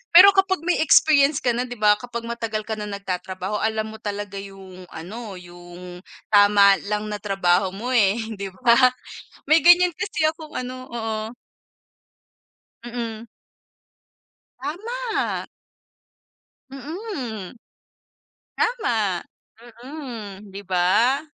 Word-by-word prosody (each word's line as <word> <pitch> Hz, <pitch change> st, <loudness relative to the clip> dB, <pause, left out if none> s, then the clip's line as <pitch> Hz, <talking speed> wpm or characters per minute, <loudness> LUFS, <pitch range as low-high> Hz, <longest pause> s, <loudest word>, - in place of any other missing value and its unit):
Pero 395 Hz, +3 st, +11 dB
kapag 375 Hz, -4 st, +2 dB
may 360 Hz, 0 st, +1 dB
experience 305 Hz, -1 st, +5 dB
ka 245 Hz, -, +3 dB
na 245 Hz, -, 0 dB
'di 245 Hz, -, -7 dB
ba, 210 Hz, -1 st, +5 dB
kapag 235 Hz, -1 st, -6 dB
matagal 230 Hz, -2 st, -4 dB
ka 220 Hz, -, -4 dB
na 210 Hz, -, -5 dB
nagtatrabaho 190 Hz, 0 st, -4 dB
alam 220 Hz, 0 st, -1 dB
mo 220 Hz, -, -11 dB
talaga 205 Hz, -2 st, -5 dB
yung 190 Hz, -2 st, -11 dB
ano, 200 Hz, +5 st, -8 dB
yung 175 Hz, 0 st, -11 dB, 0.3 s
tama 205 Hz, -1 st, +6 dB
lang 210 Hz, 0 st, -2 dB
na 210 Hz, -, -4 dB
trabaho 190 Hz, -2 st, +1 dB
mo, 245 Hz, +6 st, -4 dB
eh, 210 Hz, -4 st, +4 dB, 0.2 s
'di 200 Hz, 0 st, -5 dB, 0.2 s
ba? 235 Hz, -1 st, +6 dB, 0.7 s
May 315 Hz, +2 st, +6 dB
ganyan 355 Hz, +1 st, +7 dB
kasi 330 Hz, -6 st, -1 dB
akong 315 Hz, -1 st, -5 dB
ano 255 Hz, 0 st, -4 dB, 0.2 s
oo. 225 Hz, -2 st, -3 dB, 1.7 s
Mm. 235 Hz, -2 st, -5 dB, 1.3 s
Tama. 425 Hz, -, -3 dB, 1.3 s
Mm. 270 Hz, -, -6 dB, 1.0 s
Tama. 225 Hz, -, 0 dB, 0.6 s
Mm. 230 Hz, -9 st, -8 dB
'Di 200 Hz, +1 st, -8 dB
ba? 190 Hz, +9 st, +2 dB
220 Hz, 115 wpm, -23 LUFS, 200-280 Hz, 1.7 s, Pero